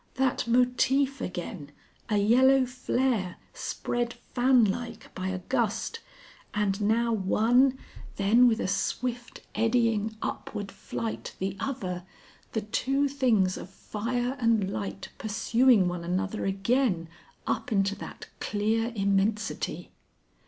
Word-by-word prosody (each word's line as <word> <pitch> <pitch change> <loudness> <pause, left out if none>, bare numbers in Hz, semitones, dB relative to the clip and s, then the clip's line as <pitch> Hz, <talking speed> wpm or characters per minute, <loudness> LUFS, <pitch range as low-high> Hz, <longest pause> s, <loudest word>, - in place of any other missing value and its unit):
That 260 -2 +1
motif 255 +3 +2
again, 175 -4 -5 0.4
a 210 - +2
yellow 255 +6 +5
flare, 250 -6 -1 0.2
spread 240 0 -2 0.2
fanlike 240 -2 +2
by 185 0 -4
a 190 0 -1
gust, 235 - -1 0.6
and 205 -1 0
now 230 +3 +2
one, 235 +6 +3 0.4
then 225 +5 +5
with 225 -2 +2
a - - -1
swift 240 +5 -2
eddying 225 -1 +1
upward 205 -2 -4
flight 220 +3 -5
the 190 0 -2
other, 185 -10 -3 0.5
the 220 - 0
two 270 +7 0
things 235 -9 +2
of 175 - -8
fire 240 +6 -3
and 225 -5 +2
light 100 -2 -5
pursuing 220 -1 +3
one 175 -1 -3
another 190 +4 -2
again 195 -2 +1 0.4
up 255 - -2
into 195 -1 +2
that - - -9
clear 220 +3 0
immensity. 200 +1 0
225 Hz, 115 wpm, -28 LUFS, 195-250 Hz, 0.6 s, yellow